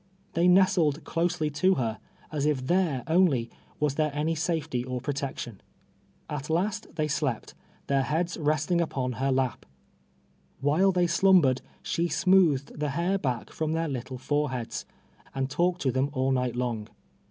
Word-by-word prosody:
They 170 +2 +3
nestled 180 -5 +4
closely 165 -2 -1
to 185 +6 +3
her, 115 -4 -2 0.3
as 150 -1 0
if 135 -4 0
there 170 -6 +1
only 160 -9 +2 0.3
was 150 -2 +1
there 155 +1 +1
any 155 +2 0
safety 160 -6 -1
or 125 0 -3
pro 135 +4 -3
tection. 130 -6 -5 0.7
At 150 0 -5
last 185 +6 0
they 155 -2 0
slept, 145 - -2 0.3
their 140 -1 +2
heads 160 +7 -1
resting 155 +2 +1
npon 130 -7 -2
her 135 +1 +1
lap. 130 -2 0 1.0
Vriiile 165 +7 +4
they 180 -1 +2
slumbered, 170 -6 +4 0.2
she 170 +1 0
smoothed 170 -8 +3
the 150 -1 0
hair 175 +7 0
ba(dc 125 -8 -3
from 155 0 -2
their 165 0 0
little 130 -2 -5
foreheads, 130 -3 -2 0.5
and 135 0 -2
talked 175 +3 +1
to 130 - +2
them 130 +3 0
all 130 -1 +1
night 125 -2 0
long. 120 -4 -2
150 Hz, 155 wpm, -27 LUFS, 130-170 Hz, 1.0 s, nestled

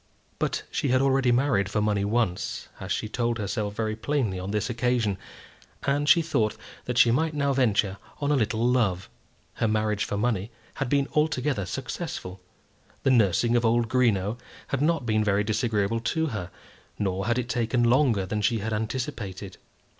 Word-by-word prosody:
But - - -1
she - - -1
had 130 0 +3
already 135 -2 +3
married 120 -6 +2
for 105 - 0
money 105 -1 +1
once, 105 -3 -1
as - - -6
she - - -1
told 120 +1 -1
herself 105 0 -3
very 110 -1 -1
plainly 115 -5 -1
on 95 +1 -5
this 105 +1 -1
occasion, 120 -5 0 0.6
and 145 +2 +1
she 170 -3 +6
thought 110 -9 0 0.3
that 125 -1 -3
she 120 - +6
might 155 +5 +1
now 140 -1 +1
venture 110 -6 +2 0.2
on 145 0 0
a - - +4
little 110 -2 +1
love. 105 -8 +1 0.4
Her 115 - 0
marriage 110 -1 0
for 100 - -3
money 110 -2 0 0.2
had 135 - -3
been 140 0 +2
altogether 145 -8 0
successful. 125 - -5 0.6
The 135 - +3
nursing 115 0 +3
of 120 - +2
old 115 0 +2
Greenow 115 -3 +1 0.3
had 140 - -1
not 155 -3 +1
been 110 -1 +2
very 105 -1 +2
disagreeable 110 0 0
to 160 +7 0
her, 90 -4 -4 0.5
nor 95 0 -1
had 120 0 +1
it 125 -2 -1
taken 120 0 0
longer 120 -5 +3
than 105 +3 -2
she 115 +2 +2
had 110 +1 -3
anticipated. 105 -4 -4
115 Hz, 175 wpm, -26 LUFS, 105-130 Hz, 0.6 s, she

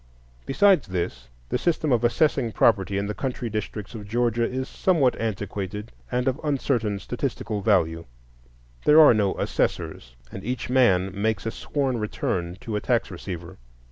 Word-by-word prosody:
Besides 190 - +4
this, 90 -7 -3 0.2
the - - 0
system 160 -3 0
of 120 -2 +2
assessing 120 -2 +2
property 100 -3 +3
in 100 - -1
the 105 - -3
country 125 -1 -4
districts 105 0 -4
of 105 -3 -8
Georgia 120 +1 +1
is 130 +1 -3
somewhat 155 -9 +2
antiquated 105 -1 -4 0.2
and 125 +1 0
of 130 +3 0
uncertain 125 -8 0
statistical 120 -2 -3
value; 80 -3 +2 0.8
there 150 +1 +7
are 155 -5 +9
no 105 -3 +1
assessors, - - -2 0.2
and 95 - -8
each 125 +1 -3
man 95 -8 +4
makes 105 +1 -1
a 115 - -1
sworn 135 -3 -2
return 90 -4 -2
to 110 - -4
a 105 - -1
tax 120 -4 0
receiver. 85 -3 -7
110 Hz, 155 wpm, -25 LUFS, 100-130 Hz, 0.8 s, are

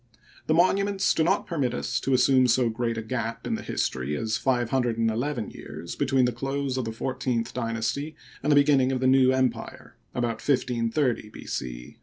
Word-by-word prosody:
The 155 - +3
monu 185 +3 +4
ments 200 -1 +1
do 160 - +2
not 190 +5 +1
permit 135 -8 -1
us 120 0 -1
to 135 - +1
assume 130 0 +4
so 120 -1 +3
g^eat 115 0 -2
a 110 - -3
gap 115 -1 -4
in - - -1
the - - -2
history 65 +3 -2
as 110 +4 -1
five 120 -3 0
hundred 125 -4 +1
and 115 -1 +2
eleven 120 0 -2
years 85 - -8
between 135 -2 +2
the 125 - +1
close 135 +2 -2
of 130 -2 -2
the 115 - -3
fourteenth 125 0 -2
dynasty 120 +6 -2 0.3
and 145 - +1
the - - +6
beginning 140 -2 +4
of 130 - -1
the 130 - -1
New 130 0 +5
Empire 130 -3 -2 0.2
(about 115 -2 -1
1530 125 -2 0
B. - - -11
c). - - -6
125 Hz, 200 wpm, -26 LUFS, 115-135 Hz, 0.3 s, the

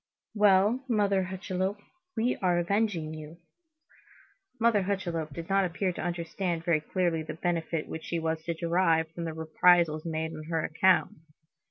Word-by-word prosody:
"Well, 210 +4 +4
Mother 200 -4 +2
Hucheloup, 190 +1 -3 0.4
we 240 +3 +1
are 180 -2 +1
avenging 175 -3 0
you." 155 +1 -9 1.2
Mother 230 -3 +4
Hucheloup 175 -5 -2
did 165 +4 -7
not 195 0 +3
appear 185 +1 -1
to - - -6
understand 170 0 -3
very 165 -3 +2
clearly 170 0 0
the 155 - -6
benefit 165 -2 -2
which 160 - -7
she 170 - -2
was 160 -1 -1
to 170 - -2
derive 165 -1 +2
from 170 +1 -5
these 160 -1 -4
reprisals 160 0 +3
made 160 -1 -3
on 155 -1 -8
her 160 -1 -1
account. 185 +3 +2
175 Hz, 155 wpm, -29 LUFS, 160-190 Hz, 1.2 s, Well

